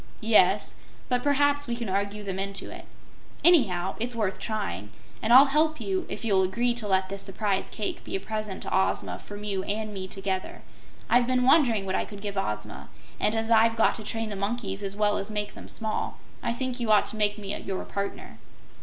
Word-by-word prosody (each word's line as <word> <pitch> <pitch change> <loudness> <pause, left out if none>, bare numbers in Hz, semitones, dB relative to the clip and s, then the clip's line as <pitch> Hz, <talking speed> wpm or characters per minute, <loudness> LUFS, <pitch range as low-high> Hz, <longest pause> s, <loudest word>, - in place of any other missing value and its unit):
"Yes; 210 -3 +4 0.4
but 250 -1 +2
perhaps 285 +1 +2
we 235 - -1
can 235 -1 -4
argue 200 +2 -2
them 190 -1 -4
into 195 0 -4
it. - - -9 0.6
Anyhow 195 - +4
it's 240 +1 -2
worth 210 -4 -1
trying, 105 - -3 0.3
and 220 - 0
I'll 260 +3 +10
help 310 +1 +2
you 380 -2 -2
if - - -5
you'll 195 -4 +3
agree 235 +6 +1
to 235 -3 -3
let 190 -1 +2
this 195 0 -4
Surprise 195 0 -1
Cake 210 - -4
be - - -5
a - - 0
present 215 -1 -4
to - - -2
Ozma 190 - +1
from 205 0 -9
you 200 -2 -1
and 215 +1 -2
me 190 -1 -5
together. 190 0 -4 0.4
I've 240 0 +4
been 255 0 +2
wondering 250 -7 +4
what 190 - -2
I - - 0
could 205 - -10
give 205 -1 -4
Ozma, 105 - -4 0.3
and 215 - +1
as 225 +1 -1
I've 225 0 +5
got 225 - +4
to 220 - -8
train 225 +1 -2
the 205 - -4
monkeys 200 -1 -3
as 195 -1 -4
well 210 0 +2
as 200 - -4
make 210 -1 -3
them - - -11
small, 220 -1 -2 0.2
I - - -1
think 255 +1 -3
you 230 -2 0
ought 210 - +5
to - - -7
make 210 -1 +2
me 200 -1 -4
your 190 -1 -4
partner." 200 0 -5
210 Hz, 210 wpm, -27 LUFS, 195-235 Hz, 0.6 s, I'll